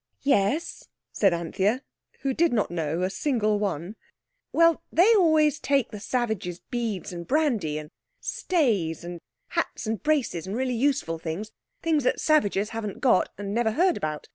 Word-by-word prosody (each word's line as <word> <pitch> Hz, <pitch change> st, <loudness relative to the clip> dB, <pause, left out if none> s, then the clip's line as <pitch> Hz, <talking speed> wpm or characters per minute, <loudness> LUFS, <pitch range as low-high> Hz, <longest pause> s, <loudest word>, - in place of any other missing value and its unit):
"Yes," 275 Hz, +4 st, +1 dB, 0.2 s
said 195 Hz, -3 st, +3 dB
Anthea, 190 Hz, -, 0 dB, 0.4 s
who 275 Hz, -1 st, 0 dB
did 335 Hz, +5 st, +2 dB
not 215 Hz, -7 st, 0 dB
know 165 Hz, 0 st, -1 dB
a 185 Hz, -, +1 dB
single 215 Hz, -4 st, 0 dB
one. 190 Hz, -1 st, -3 dB, 0.6 s
"Well, 335 Hz, -1 st, +4 dB
they 385 Hz, +8 st, +5 dB
always 315 Hz, -6 st, +4 dB
take 275 Hz, -4 st, +1 dB
the 210 Hz, -, -7 dB
savages 220 Hz, -7 st, -2 dB
beads 225 Hz, -7 st, -3 dB
and 170 Hz, -1 st, -7 dB
brandy, 245 Hz, -, +1 dB
and 150 Hz, 0 st, -8 dB, 0.3 s
stays, 210 Hz, -, 0 dB
and 175 Hz, -1 st, -7 dB, 0.3 s
hats, -, -, -2 dB
and 220 Hz, 0 st, -2 dB
braces, 275 Hz, -, 0 dB
and 195 Hz, -, -3 dB
really 255 Hz, +1 st, 0 dB
useful 245 Hz, -, 0 dB
things—things 215 Hz, -, -3 dB
the -, -, +3 dB
savages 210 Hz, -9 st, +2 dB
haven't 220 Hz, -3 st, -5 dB
got, 245 Hz, -8 st, +3 dB
and 200 Hz, 0 st, -4 dB
never 225 Hz, -1 st, +1 dB
heard 360 Hz, +5 st, +3 dB
about. 155 Hz, -1 st, -4 dB
220 Hz, 155 wpm, -26 LUFS, 180-285 Hz, 0.6 s, they